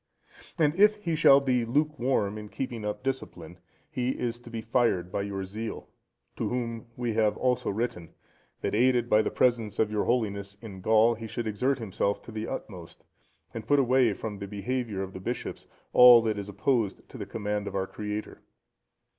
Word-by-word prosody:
And 150 -3 +3
if 210 +2 +6
he 190 -6 -3
shall 140 -3 +7
be 130 -3 +1
lukewarm 130 -5 0
in 105 0 -9
keeping 120 -3 -5
up 105 +3 -4
discipline, 90 -11 -5 0.3
he 125 +1 -2
is 120 -1 -3
to 120 - -13
be 115 -1 -5
fired 110 -6 +1
by - - -1
your 100 -1 -4
zeal; 110 +4 -6 0.5
to - - -1
whom 115 -2 -3
we 120 -2 -1
have 110 -1 +2
also 125 -1 0
written, 100 -6 -3 0.5
that - - -2
aided 120 +1 +2
by 105 - +6
the - - -1
presence 115 -4 +1
of 110 -1 +1
your 105 -1 0
Holiness 100 -4 -1
in 100 -4 -10
Gaul, 110 +3 +4
he 115 0 -7
should 115 +2 -4
exert 125 +6 0
himself 100 -3 -1
to - - -10
the 110 0 -4
utmost, 90 -5 -8 0.5
and 110 -1 -7
put 145 - +4
away 130 -4 +3
from 105 0 -6
the 100 - -5
behaviour 105 0 -3
of 95 0 -8
the - - -7
bishops 120 +6 -5 0.3
all 125 -2 +9
that 110 -2 -1
is 100 0 -6
opposed 110 +1 -1
to - - -10
the - - -5
command 105 -1 -3
of - - -5
our 95 -1 0
Creator. 105 +2 -6
115 Hz, 190 wpm, -28 LUFS, 100-125 Hz, 0.5 s, all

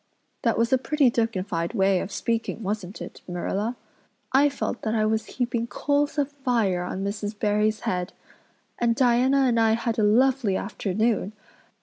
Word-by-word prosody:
That 230 - +1
was 230 +2 +2
a 260 - +4
pretty 285 -2 +2
dignified 195 -5 -1
way 195 -2 +3
of 195 - -5
speaking 230 +1 -2
wasn't 200 -1 -4
it, - - -11
Marilla?" 195 +6 -2 0.6
"I 280 +2 +5
felt 275 -3 -4
that 220 0 -1
I 215 -1 +2
was 220 0 0
heaping 235 -2 -1
coals 290 +3 0
of 290 -1 0
fire 235 -10 0
on 185 +2 -4
Mrs. 205 +1 -4
Barry's 210 +1 +1
head. 180 0 -2 0.7
And 235 -1 +2
Diana 255 +2 +3
and 245 -3 +3
I 225 -1 +4
had 230 0 -1
a - - +3
lovely 235 -1 +3
afternoon. 215 0 -1
225 Hz, 160 wpm, -25 LUFS, 205-245 Hz, 0.7 s, I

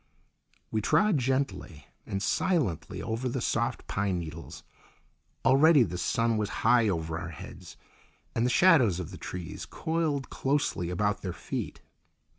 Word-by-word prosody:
We 110 - 0
trod 160 - +3
gently 130 - -2 0.2
and 95 0 -3
silently 145 - 0
over 115 +3 -2
the - - -2
soft - - -1
pine 95 -2 -1
needles. 80 -1 -7 0.8
Already 140 +1 +6
the 90 -3 -4
sun 115 +4 +1
was 105 -1 -1 0.2
high 115 -2 +5
over 80 -3 -2
our 85 0 -5
heads, 80 - -10 0.6
and 115 - 0
the 125 - +2
shadows 125 - +5
of 90 - -5
the - - -8
trees 90 +2 -6
coiled 160 -5 -2
closely 135 -11 0
about 100 +3 0
their 90 -3 -4
feet. - - -5
110 Hz, 140 wpm, -29 LUFS, 90-135 Hz, 0.8 s, Already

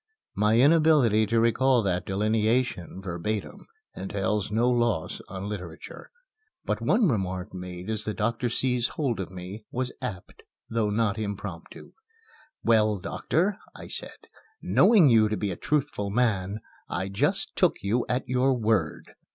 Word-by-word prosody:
My 105 +2 +3
inability 140 -7 +4
to 115 +2 +2
recall 120 +2 +3
that 90 -2 -1
delineation, 105 -2 0
verbatim, 100 - -4 0.3
entails 100 +1 -2
no 115 +3 +1
loss 120 -4 0
on 95 +1 -6
literature. 90 -5 -8 0.6
But - - -1
one 225 -4 +3
remark 95 - -2
made 90 0 -7
as 110 -1 -2
the 105 - -3
doctor 115 +3 -1
seized 125 0 +1
hold 130 -9 -1
of 95 - -4
me 95 +4 -8
was 125 0 -3
apt, 95 -4 -7 0.3
though 115 -2 0
not 105 0 0
impromptu. 100 -2 -6 0.7
"Well, 110 -2 +3
doctor," 185 - -1 0.2
I - - -10
said, - - -6 0.4
"knowing 205 -9 +5
you 110 -4 +5
to 105 - -1
be 100 -2 -2
a - - -4
truthful 135 - -1
man, 105 -3 0 0.3
I 95 +2 -2
just 170 - 0
took 180 - +3
you 115 +5 +1
at 125 +1 -1
your 130 +1 +2
word." 110 -9 -1
110 Hz, 145 wpm, -26 LUFS, 100-125 Hz, 0.7 s, knowing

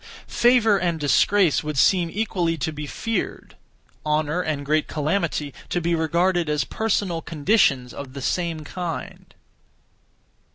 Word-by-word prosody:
Favour 235 -4 +3
and 170 -3 -1
disgrace 170 +4 +3
would 150 -1 -4
seem 175 +4 +3
equally 180 -5 -1
to 160 +2 -2
be 150 0 -6
feared; 225 +9 -4 0.5
honour 150 +2 0
and 150 -4 -3
great 155 +1 +1
calamity, 155 -2 -1 0.2
to 175 - 0
be 170 0 0
regarded 170 +1 +1
as 150 -2 +1
personal 190 0 -1
conditions 145 - +1
(of 135 -2 -8
the 140 - -7
same 170 -1 -1
kind). 170 +2 -6
165 Hz, 130 wpm, -23 LUFS, 150-185 Hz, 0.5 s, Favour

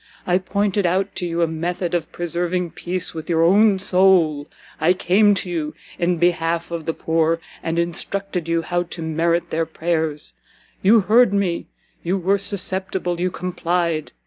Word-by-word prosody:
I 180 0 +2
pointed 200 0 0
out 190 +3 0
to 180 - -2
you 170 0 0
a - - +2
method 170 +2 -3
of 170 -3 -1
preserving 175 +1 -2
peace 180 +1 -4
with 160 +2 -7
your 165 -1 +3
own 200 +3 +5
soul; 180 -6 +3 0.3
I 160 +3 +4
came 200 +3 +3
to 185 - -4
you 155 -3 -3 0.2
in 175 0 +1
behalf 170 0 0
of 165 -2 -5
the 165 - 0
poor, 165 0 +1 0.2
and 165 0 -2
instructed 175 +1 -3
you 165 0 +1
how 175 +2 0
to 170 -1 -7
merit 165 +2 0
their 165 0 0
prayers; 160 -2 -2 0.5
you 215 +3 +6
heard 220 +2 +4
me, 190 -4 0 0.3
you 180 +3 0
were 195 +2 +1
susceptible, 190 -2 -2
you 180 +1 +1
complied! 175 -3 -2
175 Hz, 165 wpm, -21 LUFS, 165-185 Hz, 0.5 s, you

